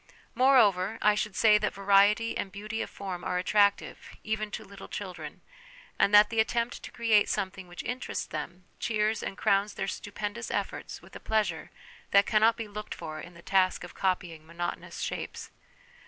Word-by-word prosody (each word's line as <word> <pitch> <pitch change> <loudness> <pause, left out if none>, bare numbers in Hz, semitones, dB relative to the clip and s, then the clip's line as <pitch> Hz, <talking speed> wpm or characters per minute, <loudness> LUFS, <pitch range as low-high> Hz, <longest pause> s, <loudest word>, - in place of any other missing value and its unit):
More 260 +3 +5
over, 200 -1 +3
I 210 - +6
should 210 -2 -2
say 210 -1 +5
that 210 - -2
variety 200 +3 +4
and 195 - -3
beauty 215 +3 -5
of - - -4
form 185 -3 -6
are 180 - -1
attractive, 200 +2 +2 0.2
even 215 0 -2
to - - -6
little 200 0 -11
children, 175 -7 -7 0.6
and 200 - +4
that 210 +1 +7
the 225 - 0
attempt 235 +1 0
to - - -8
create 225 -3 +3
something 190 -2 -3
which 175 0 -8
interests 250 +1 -4
them, 170 +4 -7
cheers 215 -1 0
and - - -5
crowns 200 -1 +1
their - - -2
stupendous 210 +3 -5
efforts - - -4
with - - -16
a - - -7
pleasure 205 -7 -1 0.4
that 200 0 +5
cannot 220 +1 +4
be 225 - -5
looked 210 +1 -7
for 155 0 -7
in 175 0 -12
the 170 - -14
task 185 -2 +2
of 180 - -9
copying 180 -4 -2
monotonous 170 +2 -5
shapes. - - -5
205 Hz, 180 wpm, -29 LUFS, 185-215 Hz, 0.6 s, that